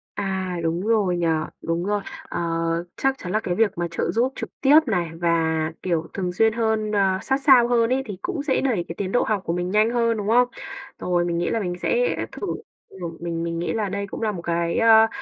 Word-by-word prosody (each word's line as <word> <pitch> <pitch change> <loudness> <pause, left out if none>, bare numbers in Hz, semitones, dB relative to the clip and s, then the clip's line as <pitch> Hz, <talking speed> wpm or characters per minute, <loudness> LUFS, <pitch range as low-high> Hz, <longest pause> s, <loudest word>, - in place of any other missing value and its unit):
À, 190 -2 -2
đúng 165 +2 0
rồi 205 -6 +2
nhỉ, 170 -1 0 0.3
đúng 165 +1 -1
rồi. 205 0 0 0.2
Ờ, - - -5 0.6
chắc 270 0 +1
chắn 180 - -6
là 215 - +2
cái 180 -5 -2
việc 210 -2 +1
mà 175 0 -1
trợ 170 - -1
giúp 250 +4 +1
trực - - -5
tiếp 290 +3 +7
này 180 -6 0
và, 170 -1 +2 0.3
kiểu, 170 -3 -1
thường 185 -2 -2
xuyên 225 +4 +3
hơn, 220 -2 0
ờ, 195 -2 +2
sát 270 +1 0
sao 260 -4 +6
hơn 235 -1 +2
ấy 265 +1 0
thì 205 -4 -6
cũng 350 -6 -3
sẽ 280 -3 +1
đẩy 225 -11 0
cái 165 - -6
tiến 195 -1 -3
độ 245 - +3
học 215 -3 0
của 165 - -1
mình 180 +1 -2
nhanh 215 +2 +4
hơn, 230 -1 +1
đúng 205 -1 -3
không? 245 +3 +4 0.5
Rồi, 175 -1 +1
mình 170 -1 -1
nghĩ 175 - 0
là 230 - 0
mình 180 -4 -2
sẽ - - +1 0.2
thử, - - -5 0.4
ừm, 170 -3 -7
mình 170 -1 -3
mình 165 0 -3
nghĩ 175 - -2
là 215 -3 -1
đây 200 +1 -3
cũng - - -7
là 220 -1 +1
một 180 -4 -6
cái, 170 0 -1
ơ, 225 -1 +7
200 Hz, 235 wpm, -23 LUFS, 175-230 Hz, 0.6 s, tiếp